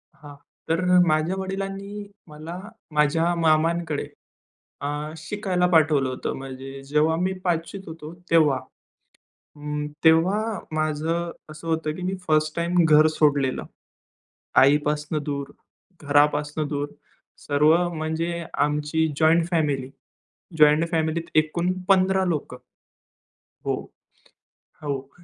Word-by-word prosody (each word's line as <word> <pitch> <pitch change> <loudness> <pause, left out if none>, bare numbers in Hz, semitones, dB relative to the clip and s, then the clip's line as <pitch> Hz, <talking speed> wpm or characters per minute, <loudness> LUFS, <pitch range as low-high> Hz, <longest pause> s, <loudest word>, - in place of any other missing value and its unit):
हां, 145 -1 -13 0.3
तर 165 +2 +1 0.3
माझ्या 155 +3 +1
वडिलांनी 195 +2 -5 0.2
मला, 155 +3 -8 0.3
माझ्या 155 +3 +2
मामांकडे 165 -1 +1 0.8
अ, - - -1 0.3
शिकायला 180 +2 -1
पाठवलं 155 -5 +3
होतं. 130 - -3
म्हणजे 135 0 -8
जेव्हा 150 +3 +2
मी 185 +1 0
5वीत 175 +2 -2
होतो 160 -1 -8 0.2
तेव्हा. 155 -5 +5 1.0
हं, 150 0 -4 0.2
तेव्हा 165 +6 +5 0.4
माझं 155 +2 -1 0.2
असं 155 +2 -10
होतं 160 -1 -1
की 180 - -8
मी 185 +1 -1
फर्स्ट 155 0 +2
टाईम 170 +1 +2
घर 155 0 +6
सोडलेलं. 145 -4 +1 1.0
आईपासून 150 +2 +2
दूर, 140 -1 -4 0.5
घरापासून 150 +1 +2
दूर, 145 0 -2 0.6
सर्व 150 +2 +4 0.2
म्हणजे 165 +2 -2
आमची 150 +2 +1
जॉइंट 165 +2 +4
फॅमिली. 145 -6 0 0.7
जॉइंट 150 +2 +5
फॅमिलीत 165 0 -1
एकूण 170 +3 +2 0.2
15 190 0 +4
लोकं 155 -7 -2 1.1
हो, - - +1 1.1
हो, 135 -2 -4
155 Hz, 105 wpm, -24 LUFS, 150-170 Hz, 1.1 s, घर